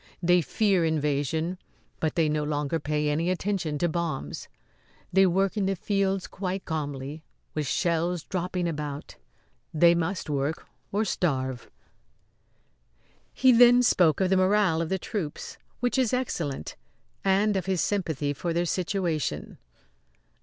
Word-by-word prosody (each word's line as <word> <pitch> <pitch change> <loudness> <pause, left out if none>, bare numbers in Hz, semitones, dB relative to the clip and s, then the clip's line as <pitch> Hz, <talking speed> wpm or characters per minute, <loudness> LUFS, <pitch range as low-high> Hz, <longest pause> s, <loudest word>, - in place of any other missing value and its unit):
They 175 +1 +5
fear 195 +1 +1
invasion, 160 +2 0 0.4
but 155 -2 -1
they 165 -2 +3
no 150 0 0
longer 150 +1 -1
pay 150 0 -1
any 160 +4 0
attention 185 -4 -1
to 175 - +1
bombs. 160 - -3 0.7
They 190 +1 +6
work 195 +3 +1
in 200 -3 0
the 195 - 0
fields 195 0 0
quite 190 0 -4
calmly, 145 -1 -4 0.3
with 150 -2 -2
shells 170 +3 0
dropping 180 -1 -2
about. 150 -3 -5 0.5
They 170 +2 +5
must 170 +2 -2
work 145 +2 -2 0.3
or 210 +3 +1
starve." 130 - -1 1.6
He 260 - +4
then 245 +1 +7
spoke 175 -9 +4
of 185 0 +2
the 190 - +4
morale 185 -3 +3
of 165 - -2
the 190 - +1
troops, 180 -5 -5 0.2
which 245 +2 +1
is 255 -3 +1
excellent, 165 - -2 0.5
and 195 +2 +3
of 190 -1 -2
his 190 -2 0
sympathy 160 -8 -1
for 170 +4 -3
their 170 +1 +1
situation. 175 -3 -2
170 Hz, 140 wpm, -27 LUFS, 150-190 Hz, 1.6 s, then